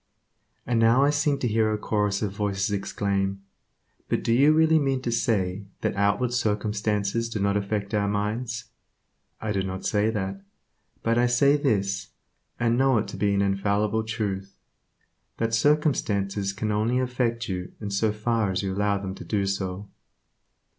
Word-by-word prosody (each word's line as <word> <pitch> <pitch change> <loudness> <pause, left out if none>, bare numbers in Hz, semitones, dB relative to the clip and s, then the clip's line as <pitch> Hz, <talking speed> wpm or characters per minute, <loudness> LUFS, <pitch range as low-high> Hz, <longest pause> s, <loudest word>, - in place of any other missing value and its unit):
And 120 -2 +1
now 115 +4 +5
I 145 - +4
seem 145 -1 +1
to 130 - -1
hear 110 -1 +2
a 105 - 0
chorus 105 -1 0
of 100 - -1
voices 100 0 -1
exclaim, 100 -1 -1 0.7
"But - - 0
do 115 - +2
you 140 +5 +5
really 160 0 +4
mean 135 -2 0
to 120 - -1
say 100 -4 0 0.2
that - - -1
outward 100 +5 +1
circumstances 105 0 0
do 110 - -3
not 100 0 +1
affect 100 0 -2
our 105 -1 +1
minds?" 110 +4 -2 0.7
I 110 - -3
do 100 -2 0
not 95 0 -5
say 105 +1 +2
that, 100 -3 -3 0.6
but 115 +1 +2
I 125 - +4
say 140 +4 +4
this, 100 -8 0 0.5
and 120 +1 +2
know 135 -2 +4
it 110 - 0
to - - -7
be 100 -1 +1
an 100 - +2
infallible 100 +2 +1
truth, 100 -3 -3 0.8
that 115 0 -1
circumstances 105 -8 +1
can 105 +2 -3
only 110 +4 +1
affect 125 -2 -1
you 90 -2 -4
in 105 -2 -5
so 105 +2 +1
far 110 0 0
as 95 +1 -1
you 95 -1 -2
allow 100 +1 +1
them 95 -1 -5
to - - -9
do 100 -2 -1
so. 95 0 -3
105 Hz, 170 wpm, -26 LUFS, 100-115 Hz, 0.8 s, now